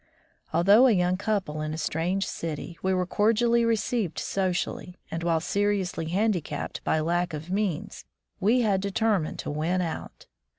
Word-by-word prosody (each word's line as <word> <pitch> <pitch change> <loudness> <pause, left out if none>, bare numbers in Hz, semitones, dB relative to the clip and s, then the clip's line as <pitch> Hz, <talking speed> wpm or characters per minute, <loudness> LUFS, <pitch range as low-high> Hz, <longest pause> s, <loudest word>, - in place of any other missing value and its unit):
Although 205 +9 +6
a 240 - +5
young 180 -1 +2
couple 195 -6 -2
in 155 0 -3
a - - -6
strange 170 +5 -1
city, 165 +1 -5
we 190 - +1
were 185 -1 +1
cordially 230 +5 +2
received 225 -5 0
socially, 180 -1 -2
and 165 - -3
while 165 -1 +2
seriously 200 -3 -1
handicapped 180 -5 -1
by 160 - +1
lack 175 +1 0
of 155 +4 -7
means, 195 -5 -2 0.3
we 230 +6 +3
had 200 -4 +2
determined 200 -4 0
to - - -4
win 160 +5 0
out. 170 -3 -5
185 Hz, 155 wpm, -27 LUFS, 165-205 Hz, 0.3 s, Although